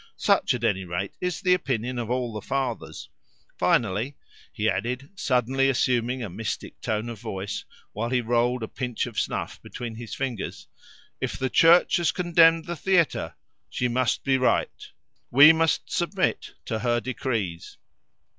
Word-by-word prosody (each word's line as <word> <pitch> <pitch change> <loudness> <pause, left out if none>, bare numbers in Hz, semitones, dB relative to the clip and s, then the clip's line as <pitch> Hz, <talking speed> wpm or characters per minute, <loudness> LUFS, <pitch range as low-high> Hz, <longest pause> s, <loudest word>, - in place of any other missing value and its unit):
Such, - - +2
at 120 - -6
any 100 -5 +1
rate, 90 +2 -4
is 180 -3 -2
the 180 -1 +4
opinion 125 -7 -1
of 115 -2 -4
all 125 -2 -1
the 105 - -5
Fathers. 130 +1 -3 0.5
Finally," 115 +5 +1 0.4
he 110 -2 -1
added, 125 +7 -2
suddenly 135 - +1
assuming 125 -1 +1
a - - -3
mystic 105 +4 -6
tone 110 +1 -2
of 115 -3 -7
voice 100 -3 -5 0.3
while 115 +3 -2
he 125 0 +2
rolled 120 +1 +1
a - - -3
pinch 125 -1 -3
of 120 -4 -4
snuff - - -3
between 120 -2 -7
his 115 -2 -7
fingers, 125 -7 -4 0.5
"if - - -2
the 130 -1 -2
Church 170 +2 +6
has 175 -2 +2
condemned 165 -2 +4
the 175 - -4
theatre, 170 0 +1 0.3
she 125 - -1
must 125 0 0
be 135 -1 +2
right; 125 - 0 0.4
we 145 +5 +9
must 160 0 0
submit 185 +2 -1
to 110 -2 -2
her 120 0 +1
decrees." 115 -9 -4
125 Hz, 155 wpm, -25 LUFS, 115-135 Hz, 0.5 s, we